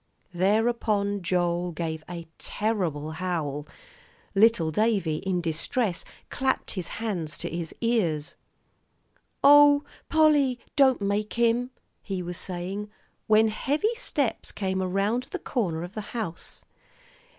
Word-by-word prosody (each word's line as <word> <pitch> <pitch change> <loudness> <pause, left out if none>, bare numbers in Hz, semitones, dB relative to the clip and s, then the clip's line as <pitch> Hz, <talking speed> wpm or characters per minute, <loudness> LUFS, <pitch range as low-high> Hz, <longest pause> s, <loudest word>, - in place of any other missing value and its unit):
Thereupon 205 +1 +1
Joel 175 0 0
gave 160 -1 -4
a 170 -2 -7
terrible 175 -9 -1
howl. 160 -4 -3 0.7
Little 200 -6 +4
Davie, 200 -5 +1
in 185 0 -1
distress, 170 +4 -1 0.3
clapped 265 0 0
his 185 -4 -4
hands 185 -8 -2
to - - -4
his 170 -1 -4
ears. 180 -11 0 1.1
"Oh, 290 0 +8 0.3
Polly, 295 -5 +4 0.2
don't 265 -5 +4
make 205 +1 -1
him," 235 +1 +2 0.3
he 190 -3 -4
was 175 0 -5
saying, 190 +3 -5 0.4
when 220 +1 +5
heavy 295 - 0
steps 295 - -2
came 190 -1 -2
around 200 +7 0
the 380 - -3
corner 185 - -2
of 175 +2 -8
the 215 - -4 0.2
house. 180 -8 -6
200 Hz, 115 wpm, -26 LUFS, 175-235 Hz, 1.1 s, Oh